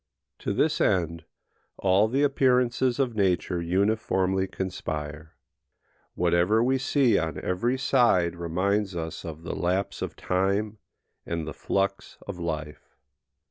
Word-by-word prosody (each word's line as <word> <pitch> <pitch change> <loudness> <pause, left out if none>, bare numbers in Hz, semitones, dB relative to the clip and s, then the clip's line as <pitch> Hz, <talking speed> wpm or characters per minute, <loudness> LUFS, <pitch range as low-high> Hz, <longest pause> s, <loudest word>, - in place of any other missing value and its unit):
To - - -2
this - - +1
end 85 -3 +1 0.5
all 95 +3 +3
the 135 +5 +1
appearances 125 -3 +2
of 130 -4 0
nature 90 -3 +1
uniformly 95 +1 +1
conspire. 80 -5 -5 0.8
Whatever 90 +6 +3
we 130 +2 +2
see 130 -4 +3
on 80 -1 -3
every 120 +8 0
side 120 -11 +3
reminds 95 +4 -1
us 80 -2 -5
of 80 -2 -8
the - - -4
lapse 95 +3 -1
of - - -4
time 100 +3 -1 0.4
and 85 -2 -3
the 80 - -5
flux 100 +4 -2
of 95 -3 -6
life. 80 -3 -5
95 Hz, 125 wpm, -26 LUFS, 85-110 Hz, 0.8 s, all